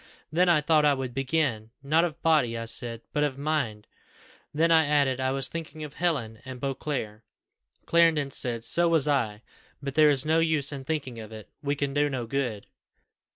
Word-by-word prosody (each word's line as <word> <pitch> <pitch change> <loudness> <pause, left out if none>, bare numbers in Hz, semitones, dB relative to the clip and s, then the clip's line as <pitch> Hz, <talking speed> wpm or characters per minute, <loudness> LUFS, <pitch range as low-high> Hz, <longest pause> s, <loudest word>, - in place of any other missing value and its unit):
then 175 +3 +3
I 160 -3 +4
thought 155 0 +3
I 145 -1 +4
would 130 -2 -5
begin. 135 -5 -1
'Not 155 +4 +3
of 165 -2 -3
body,' 145 -8 +2
I 115 - -4
said, 115 0 -3
'but 150 -2 +1
of 140 -3 -1
mind;' 140 -8 -2 0.7
then 165 +3 +2
I 160 -2 +5
added, 140 -3 +2
'I 130 0 0
was 135 0 0
thinking 160 -1 -7
of 150 -2 -8
Helen 140 -12 -2
and 130 -1 -8
Beauclerc,' 135 -5 -4 0.6
Clarendon 165 -4 +3
said, 120 -3 0
'So 170 +8 +3
was 160 -4 +3
I; 115 -7 0 0.4
but 140 -1 -5
there 155 +1 +5
is 140 -1 +2
no 160 +1 +3
use 155 -3 +3
in 135 -2 -7
thinking 135 -6 -3
of 110 0 -9
it; 110 -1 -10
we 145 0 -1
can 140 -1 -2
do 145 +1 +2
no 130 -4 -3
good. 115 -5 -3
140 Hz, 195 wpm, -27 LUFS, 125-155 Hz, 0.7 s, I